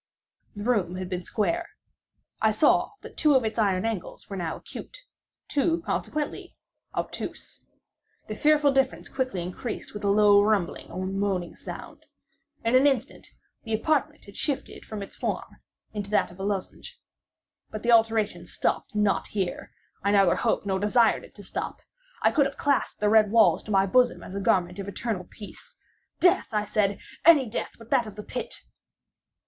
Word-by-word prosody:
The 205 - -6
room 205 -7 +1
had 185 0 -5
been 180 -1 -4
square. 335 +10 -1 0.7
I - - +5
saw - - +3
that - - -12
two 300 -3 +4
of 255 -3 +3
its 220 +1 -2
iron 195 -2 +2
angles 225 -6 -4
were - - -3
now 170 -4 -3
acute—two, 335 - -4
consequently, 300 -1 -3 0.4
obtuse. - - -5 0.7
The 215 - -4
fearful 295 +4 +4
difference 270 -1 0
quickly 255 -9 -2
increased 185 +6 -6
with 210 0 -7
a 200 - +2
low 205 0 +6
rumbling 205 -4 0
or 185 +2 -4
moaning 195 -2 -2
sound. - - -9 0.6
In 230 - +2
an 260 +3 +6
instant 270 -1 -1 0.4
the 225 -1 -1
apartment 285 +5 0
had 200 - -13
shifted 285 -3 -3
its 200 -1 -7
form - - -4 0.4
into 205 -2 -4
that 210 -4 +2
of 175 - -15
a - - -4
lozenge. 200 -2 -4 0.7
But 215 - -7
the 240 - +3
alteration 225 -2 +3
stopped - - -2
not 210 -1 +1
here—I 195 0 -4
neither 200 -2 +5
hoped - - 0
nor 190 -1 0
desired 225 +3 +3
it - - -15
to - - -11
stop. - - -4 0.4
I - - +5
could 285 -4 +3
have 275 - -10
clasped 280 -6 0
the 210 - +3
red 215 -1 +5
walls 225 +1 +5
to - - -11
my 195 -1 +4
bosom 245 +5 +3
as - - -9
a 200 - -3
garment 180 -1 +1
of 195 - -5
eternal 200 -2 -3
peace. 205 - -12 0.4
"Death," 360 +1 +4
I 210 0 +1
said, 205 -1 +1 0.3
"any 310 -4 +7
death 220 - -4
but 230 0 -15
that 250 -5 +3
of 210 - -9
the 210 - -7
pit!" 250 - -5
215 Hz, 170 wpm, -26 LUFS, 195-255 Hz, 0.7 s, any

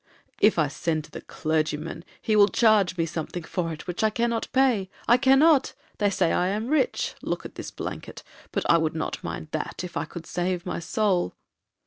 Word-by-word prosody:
'If 210 -2 +4
I 155 -3 +3
send 155 +2 -2
to - - -16
the - - -7
clergyman, 155 +1 -2 0.2
he 215 - 0
will 205 -1 +7
charge 210 -6 +3
me 165 - +1
something 170 +1 -5
for 165 0 -2
it, 155 - -8
which 180 +4 -3
I 220 - +5
cannot 235 +1 -1
pay,—I 240 -3 +2
cannot. 275 +2 +4 0.2
They 205 -1 +3
say 185 -3 +1
I 180 - +2
am 215 +5 -2
rich,—look 310 +11 -1
at - - -8
this - - -7
blanket;—but - - -7
I 170 - +5
would 160 0 -1
not 160 - -3
mind 155 - -5
that, 155 +3 -4
if 180 -1 -7
I - - -1
could 165 +1 -9
save 180 +1 -2
my 180 - -3
soul.' 185 - 0
180 Hz, 185 wpm, -26 LUFS, 165-220 Hz, 0.2 s, will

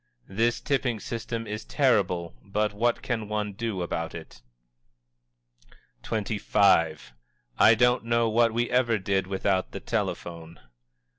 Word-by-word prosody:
"This 115 +4 +1
tipping 130 -5 -1
system 115 +1 -5
is 105 0 -5
terrible, 95 - +1
but 105 +1 -1
what 120 +3 0
can 110 -4 -3
one 105 -1 -2
do 105 -3 -3
about 85 -1 -4
it?" 80 -7 -11 1.6
XXV. 100 - +1 0.5
"_I 110 0 +7
don't 125 0 +3
know 115 0 +2
what 115 +1 +3
we 120 +2 0
ever 120 -3 +2
did 95 -1 -1
without 95 -1 -1
the - - -5
telephone! 85 -1 -4
105 Hz, 125 wpm, -26 LUFS, 95-115 Hz, 1.6 s, I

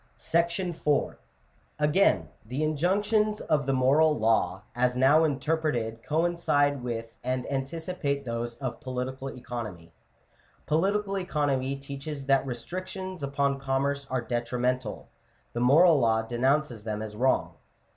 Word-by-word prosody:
M 170 -3 +1 0.6
Again, 150 +6 +3
the 125 +7 -3
injunctions 205 +7 +1
of 145 -4 0
the - - +2
moral 145 +4 +4
law, 105 -4 +1
as 125 0 +1
now 140 +5 +5
interpreted, 145 -7 -1
coincide 150 -3 +1
with 115 -2 -4
and 125 0 -1
anticipate 140 0 -2
those 115 0 -3
of 125 0 -5
political 130 +1 -4
economy. 110 -10 -7 0.7
Po 155 +2 +2
litical 200 0 0
economy 140 -6 0
teaches 140 +1 -7
that 135 0 +3
restrictions 185 +7 -5
upon 140 0 0
commerce 135 +1 -1
are 130 -1 0
detrimental: 120 0 -2 0.5
the 120 - -2
moral 150 +6 +6
law 110 -2 +2
denounces 125 0 0
them 110 -1 -3
as 105 -1 -7
wrong 130 +4 +2
(Chap. - - -23
XXIII.). - - -29
135 Hz, 125 wpm, -28 LUFS, 125-155 Hz, 0.7 s, moral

